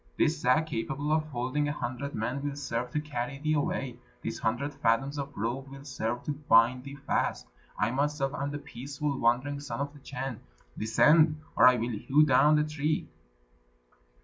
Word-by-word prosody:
This - - +2
sack, 125 +6 +3
capable 145 +1 -3
of 155 0 +2
holding 135 +2 -1
a - - 0
hundred 130 +2 -4
men, 125 +5 -2
will 145 0 -3
serve 125 -3 -3
to 150 - -1
carry 135 -3 -4
thee 155 +2 0
away, 135 -3 -1 0.2
this - - -4
hundred 125 +6 -1
fathoms 135 +4 +1
of 140 0 -6
rope 120 +6 -2
will 135 0 -10
serve 120 -3 -3
to - - -2
bind 125 -4 +4
thee 140 0 -7
fast; 140 0 -1 0.3
I 105 +3 +1
myself 140 +1 0
am 140 0 -2
the 145 - -4
peaceful 140 0 -4
wandering 130 +4 +1
Son 135 -4 -5
of 140 +1 -3
the 145 - -14
Chan. 135 -3 -5 0.4
Descend, 150 +8 +4 0.2
or - - +7
I 125 - +7
will 120 +1 -2
hew 145 +8 +3
down 150 +2 +5
the 150 - +3
tree." 150 0 -1
140 Hz, 180 wpm, -29 LUFS, 125-145 Hz, 0.4 s, or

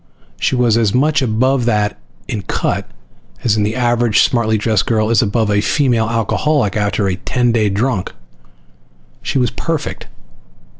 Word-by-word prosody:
She - - 0
was 120 -3 +2
as 110 -2 +1
much 150 +3 +2
above 130 +2 +1
that 105 -3 0 0.3
in 105 - -3
cut 95 - -2 0.5
as 115 - +2
the 105 0 0
average 120 -3 +2
smartly 110 -3 +1
dressed 110 -2 0
girl 110 -1 +1
is 115 - +4
above 110 0 0
a 105 0 +2
female 120 -4 +1
alcoholic 115 +1 0
after 105 -1 0
a 90 -1 -1
ten 120 +5 0
day 110 -3 +1
drunk. 105 0 -1 1.1
She - - -2
was 125 -2 +1
perfect. 165 -3 -4
115 Hz, 150 wpm, -16 LUFS, 105-125 Hz, 1.1 s, is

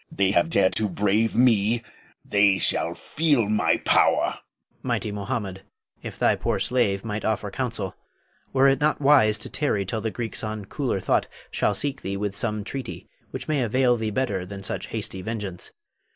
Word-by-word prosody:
They 95 -1 +2
have 85 -3 +2
dared 95 +3 +3
to 110 -1 0
brave 105 +4 +1
me, 115 -2 +3 0.4
they 100 -1 +4
shall - - 0
feel 145 -9 +1
my 100 -6 +2
power! - - +3
Hafiz. - - -10 0.4
Mighty 105 - -1
Mohammed, 100 -1 -4 0.4
if - - -7
thy - - +3
poor - - -1
slave 110 -5 +1
might 105 -1 -3
offer 105 -2 -1
counsel, 115 -6 -3 0.6
were 135 +1 +4
it 135 0 +3
not 150 +1 +2
wise 135 -7 +5
to 110 - -4
tarry 105 -10 0
till 110 +3 -3
the 110 - -1
Greeks 115 0 -4
on 110 -1 -4
cooler 125 -3 -2
thought - - +1 0.2
shall 105 - +1
seek 140 +4 -2
thee 100 +1 -3
with 100 0 -3
some 105 0 -2
treaty 130 +5 -7 0.2
which - - -6
may 150 -3 +1
avail 125 +1 +3
thee 110 -2 -2
better 105 -4 -1
than 100 +1 -8
such - - -3
hasty 95 - -5
vengeance. 100 -3 -5
110 Hz, 180 wpm, -25 LUFS, 100-125 Hz, 0.6 s, wise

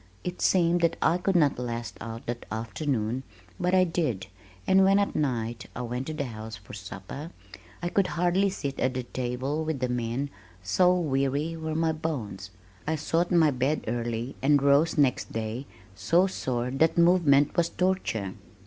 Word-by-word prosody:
It 180 0 -5
seemed 175 -1 +3
that 170 - +2
I 170 +2 +2
could 190 +1 0
not 150 -7 +3
last 115 -4 -4
out 115 0 -7
the 120 - -1 0.2
afternoon, 115 +1 -2 0.4
but 180 +1 +2
I 185 - +6
did, 160 - -1 0.4
and 190 0 +5
when 195 +1 +5
at 200 0 +1
night 120 -5 -1
I 125 - -3
went 125 +2 -4
to 155 - -3
the 150 - -1
house 110 -2 -7
for 100 -2 -13
supper, 100 - -7 0.5
I 175 - 0
could 190 +1 +2
hardly 180 +3 +2
sit 140 -7 -4
at 130 0 +1
the 130 - -2
table 130 +5 -2
with 155 -3 -2
the 125 0 -1
men, 125 +3 -2 0.3
so 180 - +4
weary 140 +1 0
were 160 -1 -4
my 165 0 +2
bones. 125 - -4 0.4
I 160 - +1
sought 165 +3 0
my 165 -4 +5
bed 135 +4 0
early 120 +2 -2
and 145 +2 +4
rose 140 +4 +3
next 140 -4 +2
day 115 +4 -4 0.3
so 170 - +3
sore 125 -9 -2
that 160 +5 +2
movement 165 -5 +4
was 170 -1 +2
torture. 180 - -1
140 Hz, 175 wpm, -27 LUFS, 120-165 Hz, 0.5 s, I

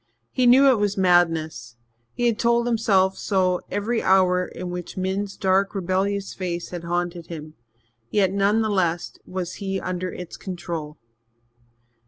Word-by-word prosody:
He 255 -1 +2
knew 265 +3 +7
it 240 - +2
was 205 -1 0
madness 165 -9 +2 0.4
he 240 - 0
had 230 -2 +1
told 235 0 +2
himself 200 -5 +2
so 185 -3 +1
every 225 +3 -1
hour 180 -1 +3
in 180 0 -7
which 180 0 -6
Min's 190 +2 -2
dark, 195 +2 +1
rebellious 195 +2 -1
face 175 -2 -4
had 175 -1 -6
haunted 175 0 -2
him 155 -2 -8 0.6
yet 195 -3 +2
none 200 +3 +2
the 220 - 0
less 175 -4 -1
was 185 -1 -4
he 195 -1 -2
under 185 0 -3
its 180 -1 -8
control. 170 -5 -6
185 Hz, 150 wpm, -23 LUFS, 175-200 Hz, 0.6 s, knew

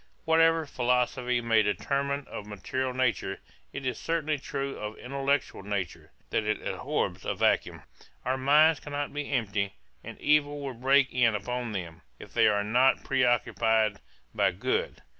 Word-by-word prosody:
Whatever 165 0 +4
philosophy 125 -1 0
may 115 -1 +3
determine 140 +6 -1
of 105 - -7
material 130 +6 -3
nature, 125 -6 -1 0.3
it 140 -1 -6
is 130 - -2
certainly 155 -3 -1
true 140 -1 -4
of 105 +1 -6
intellectual 140 0 -1
nature, 100 -2 -4 0.2
that 110 - +1
it 105 0 -1
abhors - - -2
a - - -2
vacuum: - - +1 0.4
our 130 +1 +1
minds 150 +4 +5
cannot 145 -1 -4
be 145 0 -4
empty; 105 -6 -1 0.3
and - - -9
evil 145 -1 +2
will 140 -2 -4
break 135 +3 +3
in 115 -3 +3
upon 120 +2 -3
them, 85 -4 -6 0.2
if - - -13
they - - +5
are 105 -1 +2
not 125 +5 +3
pre 135 -1 +1
occupied 110 -3 +2 0.3
by - - +3
good. - - -2
125 Hz, 155 wpm, -28 LUFS, 110-140 Hz, 0.4 s, minds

